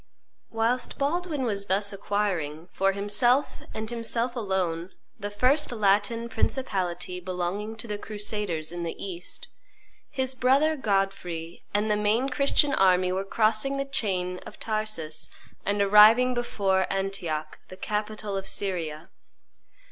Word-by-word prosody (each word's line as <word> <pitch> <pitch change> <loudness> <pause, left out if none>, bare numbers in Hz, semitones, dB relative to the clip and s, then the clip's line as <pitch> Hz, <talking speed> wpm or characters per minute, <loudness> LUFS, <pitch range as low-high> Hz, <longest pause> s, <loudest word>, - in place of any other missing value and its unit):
Whilst 230 +3 0
Baldwin 305 0 -1
was 200 -4 -2
thus 200 +1 +2
acquiring, 185 -6 -2
for 195 0 +2
himself 210 +7 +2
and 220 0 -4
himself 235 +1 -1
alone, 185 -6 -1 0.3
the 205 0 -3
first 255 +9 +2
Latin 215 +1 +2
principality 185 -7 -2
belonging 185 +4 -3
to 225 +1 -7
the 210 -1 -4
crusaders 205 -7 -2
in 175 0 -5
the 170 -1 -3
East, 180 -2 -6 0.6
his 260 -1 -1
brother 270 +5 +3
Godfrey 195 - -2
and 210 +1 +1
the - - +4
main 215 +6 +2
Christian 280 +1 +3
army 185 -3 +4
were 190 +1 -1
crossing 220 +6 +1
the 275 - -1
chain 185 -9 -1
of - - -12
Taurus 215 -8 -2 0.4
and 205 0 +1
arriving 215 +5 +7
before 195 -6 0
Antioch, 185 -6 -3
the 185 - -11
capital 210 0 -3
of 195 0 -3
Syria. 170 -5 -2
205 Hz, 130 wpm, -27 LUFS, 185-230 Hz, 0.6 s, arriving